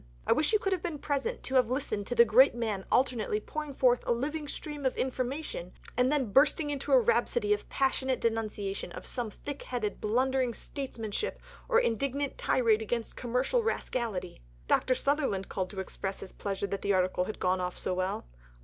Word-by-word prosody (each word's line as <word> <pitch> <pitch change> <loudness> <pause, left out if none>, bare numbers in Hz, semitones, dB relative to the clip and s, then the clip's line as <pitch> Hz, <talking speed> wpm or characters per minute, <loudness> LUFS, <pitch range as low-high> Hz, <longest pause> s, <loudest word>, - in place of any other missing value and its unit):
I - - +1
wish 305 - +1
you 430 - +5
could 390 -2 0
have 365 - -1
been 335 -4 -3
present 290 - -2
to 265 - -6
have 250 -3 +4
listened 230 -6 -2
to 245 - -2
the 235 - +8
great 235 +4 +6
man 215 -5 -2
alternately 235 -4 +2
pouring 300 +5 -5
forth 245 -2 +3
a - - +2
living 290 +6 -1
stream 295 0 -6
of 260 - 0
information, 255 - -3 0.2
and 250 +2 +3
then 270 -8 +1
bursting 290 +4 +4
into 280 -2 -3
a - - +8
rhapsody 465 -2 +2
of 415 - -4
passionate 265 -1 +1
denunciation 215 -5 -2
of - - -8
some 240 -4 -1
thick 285 +6 -7
headed 225 -5 -3
blundering 255 +2 +1
statesmanship 255 - -4 0.3
or 470 -1 +5
indignant 275 - -1
tirade 225 -3 +3
against 225 +1 -3
commercial 250 - +1
rascality." 230 - -2 0.3
Dr. 255 - +3
Sutherland 270 -8 0
called 185 -1 -2
to 195 - -7
express 190 +1 -4
his 190 - -7
pleasure 200 -1 -3
that 200 0 -3
the 200 - +1
article 185 -1 +2
had 215 - -6
gone 185 0 +1
off 180 0 -3
so 185 - -1
well. 185 - -2
250 Hz, 185 wpm, -30 LUFS, 210-285 Hz, 0.3 s, the